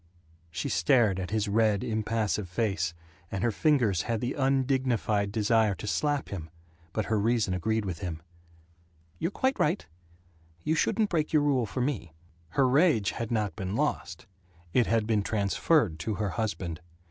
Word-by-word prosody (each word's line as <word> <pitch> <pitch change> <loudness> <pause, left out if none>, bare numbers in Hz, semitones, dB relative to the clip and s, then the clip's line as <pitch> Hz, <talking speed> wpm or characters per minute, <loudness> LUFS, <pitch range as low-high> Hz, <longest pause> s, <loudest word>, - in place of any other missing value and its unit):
She 85 +1 -3
stared 95 +3 +3
at 90 -2 -4
his 110 +1 0
red 105 0 +2
impassive 110 -4 -1
face, 90 -3 -1 0.3
and 95 - -3
her 120 - +2
fingers 115 - +2
had 115 +2 -2
the 125 +3 -2
undignified 130 -6 +1
desire 110 -1 +2
to - - -8
slap 145 +6 0
him, 85 -5 -6 0.4
but 110 +1 -2
her 110 -1 +1
reason 110 -2 +1
agreed 110 +4 0
with 90 -4 -4
him. 85 -3 -4 1.0
"You're 165 - 0
quite 260 +6 0
right. 90 - +1 0.8
You 155 - +1
shouldn't 210 +6 +1
break 155 -3 0
your 150 -2 +4
rule 135 -6 +2
for 125 - -3
me." 120 - -2 0.4
Her 135 - +5
rage 135 - +3
had 115 -1 -4
not 105 -7 -1
been 95 +1 -4
lost. - - -2 0.5
It 125 - +3
had 115 -2 +2
been 110 -2 +2
transferred 100 - +1
to 105 +7 -2
her 105 0 -1
husband. 95 -7 -3
110 Hz, 160 wpm, -28 LUFS, 100-125 Hz, 1.0 s, Her